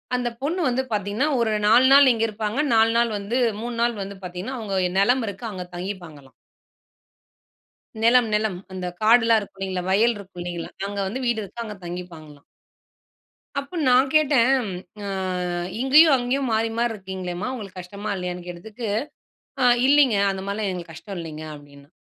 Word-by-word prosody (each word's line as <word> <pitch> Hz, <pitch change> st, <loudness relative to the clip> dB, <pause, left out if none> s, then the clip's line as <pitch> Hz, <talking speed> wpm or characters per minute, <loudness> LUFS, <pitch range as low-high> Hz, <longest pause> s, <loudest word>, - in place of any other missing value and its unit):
அந்த 250 Hz, -1 st, -1 dB
பொண்ணு 330 Hz, +6 st, -1 dB
வந்து 255 Hz, +1 st, 0 dB
பாத்தீங்கன்னா 205 Hz, +7 st, 0 dB
ஒரு 225 Hz, -2 st, +1 dB
4 240 Hz, +4 st, +6 dB
நாள் 280 Hz, -1 st, +8 dB
இங்க 225 Hz, -1 st, -1 dB
இருப்பாங்க, 215 Hz, +3 st, -3 dB, 0.2 s
4 225 Hz, 0 st, +5 dB
நாள் 235 Hz, -1 st, +2 dB
வந்து 205 Hz, +5 st, -2 dB, 0.2 s
3 240 Hz, +1 st, -4 dB
நாள் 235 Hz, 0 st, +2 dB
வந்து 195 Hz, 0 st, -6 dB
பாத்தீங்கன்னா 180 Hz, +9 st, -5 dB
அவங்க 205 Hz, -3 st, -4 dB
ஓ -, -, -4 dB
நிலம் 245 Hz, +5 st, +3 dB
இருக்கு 200 Hz, +4 st, -6 dB
அங்க 185 Hz, -2 st, -5 dB
தங்கிப்பாங்களாம். 175 Hz, -7 st, -7 dB, 1.7 s
நிலம், 235 Hz, 0 st, +5 dB
நிலம் 210 Hz, -3 st, 0 dB, 0.2 s
அந்த 185 Hz, -1 st, -4 dB, 0.2 s
காடெல்லாம் 225 Hz, 0 st, +5 dB
இருக்கும் 195 Hz, -1 st, -12 dB
இல்லீங்களா, 185 Hz, -1 st, -2 dB
வயல் 225 Hz, +5 st, +3 dB
இருக்கும் 195 Hz, -3 st, -10 dB
இல்லீங்களா, 175 Hz, -1 st, -5 dB, 0.2 s
அங்க 200 Hz, 0 st, -6 dB
வந்து 245 Hz, +7 st, -4 dB
வீடு 240 Hz, -2 st, +1 dB
இருக்கு. 220 Hz, +4 st, -7 dB
அங்க 210 Hz, -2 st, -7 dB
தங்கிப்பாங்களாம்! 165 Hz, -5 st, -9 dB, 1.2 s
அப்ப, 280 Hz, +3 st, -14 dB, 0.2 s
நான் 255 Hz, +2 st, +5 dB
கேட்டேன், 275 Hz, -4 st, +4 dB, 0.5 s
அ -, -, -4 dB, 0.7 s
"இங்கயும் 295 Hz, +3 st, +6 dB
அங்கயும் 255 Hz, +2 st, -1 dB
மாறி 225 Hz, +1 st, +1 dB
மாறி 240 Hz, 0 st, +2 dB
இருக்கீங்ளேம்மா, 190 Hz, 0 st, -5 dB
உங்களுக்கு 195 Hz, -6 st, -8 dB
கஷ்டமா 200 Hz, +4 st, -7 dB
இல்லையான்னு 180 Hz, -1 st, -5 dB
கேட்டதுக்கு. 210 Hz, +7 st, -7 dB, 0.7 s
அ -, -, +3 dB, 0.2 s
இல்லீங்க 275 Hz, -5 st, +5 dB
அந்த 195 Hz, -, -4 dB
மாதிரிலாம் 200 Hz, +1 st, -2 dB
எங்களுக்கு 175 Hz, -3 st, -6 dB
கஷ்டம் 195 Hz, +4 st, -8 dB
இல்லீங்க 155 Hz, -2 st, -7 dB
அப்படின்னா" 145 Hz, -1 st, -15 dB
210 Hz, 160 wpm, -23 LUFS, 180-240 Hz, 1.7 s, நாள்